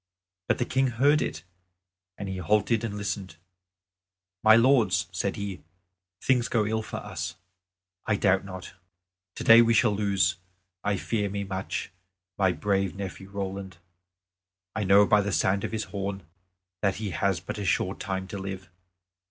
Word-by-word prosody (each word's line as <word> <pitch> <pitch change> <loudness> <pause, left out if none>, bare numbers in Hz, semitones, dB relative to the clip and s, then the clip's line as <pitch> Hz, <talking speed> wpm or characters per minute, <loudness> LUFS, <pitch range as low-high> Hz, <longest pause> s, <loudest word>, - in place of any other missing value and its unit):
But - - +2
the 120 - 0
King 130 +1 +1
heard 140 +5 +3
it, 75 - -3 0.7
and 100 - -5
he 95 -1 -4
halted 105 +5 +1
and 105 -3 -3
listened. 95 -3 -4 1.1
"My 110 0 +8
lords!" 115 -7 +4
said 95 +1 -2
he, 100 -3 -5 0.6
"things 125 -3 +2
go 110 -3 +1
ill 110 +1 0
for - - -6
us, 95 -4 -5 0.7
I 110 - +3
doubt 95 -1 +2
not. 95 -1 -8 0.6
Today 115 +1 +7
we 115 0 +3
shall 110 0 +4
lose, 100 -4 +1 0.5
I 100 -1 +1
fear 105 +1 -1
me 100 +1 -3
much, 95 -1 -4 0.4
my 95 -2 +3
brave 95 -1 0
nephew 95 0 -7
Roland. 95 -2 -5 1.0
I 105 - -1
know 100 +2 +6
by 105 0 +4
the 100 0 -2
sound 95 +1 +1
of - - -3
his 110 -1 -2
horn 100 -1 -4 0.6
that 100 -2 +1
he 105 -2 -4
has 95 +2 0
but 95 +3 -6
a - - -3
short 95 0 0
time 95 -2 -3
to 100 - -5
live. 95 -2 -6
100 Hz, 160 wpm, -27 LUFS, 95-110 Hz, 1.1 s, My